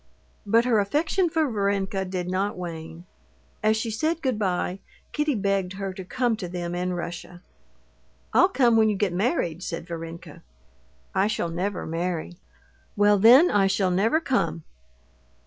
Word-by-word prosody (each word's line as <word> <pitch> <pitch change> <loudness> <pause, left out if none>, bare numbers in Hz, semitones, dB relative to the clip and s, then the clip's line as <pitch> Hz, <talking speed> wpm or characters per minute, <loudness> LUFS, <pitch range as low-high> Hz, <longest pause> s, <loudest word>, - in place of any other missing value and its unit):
But 230 +3 +4
her 235 -4 +3
affection 310 - +1
for 315 -1 +1
Varenka 200 -3 -1
did 180 -1 -4
not 190 +2 -1
wane. 165 -1 -7 0.6
As 215 +1 +2
she 225 +1 -2
said 315 +9 -1
good 255 -5 0
bye, 185 -1 -1 0.3
Kitty 300 -2 0
begged 195 -3 -1
her 195 0 -5
to 190 - -8
come 240 +5 0
to 185 - -5
them 175 -1 -4
in 180 +1 -2
Russia. 175 +1 -7 0.9
"I'll 370 - +5
come 245 -10 +3
when 220 -1 +4
you 210 - 0
get 195 -2 0
married," 180 - -1
said 165 -2 -5
Varenka. 165 -1 -8 0.7
"I 195 +2 +2
shall 215 -5 -2
never 185 +4 -3
marry." 170 +1 -3 0.6
"Well, 205 -1 +4
then, 250 - +7
I 200 -2 +3
shall 190 -1 +1
never 215 - +2
come." 170 - -1
195 Hz, 155 wpm, -25 LUFS, 180-225 Hz, 0.9 s, then